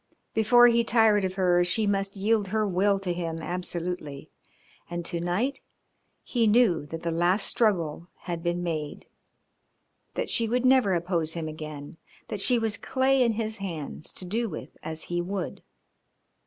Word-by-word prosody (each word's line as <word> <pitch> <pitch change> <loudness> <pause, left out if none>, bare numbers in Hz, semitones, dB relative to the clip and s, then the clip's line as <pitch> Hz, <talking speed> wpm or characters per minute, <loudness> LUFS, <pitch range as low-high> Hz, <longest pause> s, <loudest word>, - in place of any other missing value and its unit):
Before 240 +3 +6
he 235 -1 +5
tired 225 -3 +4
of 185 0 -3
her 180 -2 +3
she 195 +5 +1
must 195 0 -1
yield 205 +1 +1
her 215 +2 0
will 195 +2 +2
to 180 -2 -2
him 165 -2 -4
absolutely. 175 -4 -4 0.6
And 175 0 -4
to 170 0 0
night 200 +11 -1 0.6
he 235 -3 +1
knew 210 -9 +3
that 165 +2 -7
the 170 - -1
last 175 +5 +2
struggle 170 -7 0
had 170 -2 -4
been 175 +1 -1
made, 155 -4 -4 1.1
that - - -1
she 230 -2 +1
would 250 +2 +1
never 255 -7 +4
oppose 170 -2 -1
him 165 -2 -4
again, 155 -1 -8 0.3
that 205 - -3
she 250 +3 +4
was 225 -2 0
clay 265 0 +1
in 235 -2 +3
his 220 0 -3
hands 165 -6 -6
to 185 - -4
do 225 +5 -1
with 155 - -8
as 160 0 -5
he 175 0 -2
would. 185 0 -4
185 Hz, 165 wpm, -27 LUFS, 170-220 Hz, 1.1 s, Before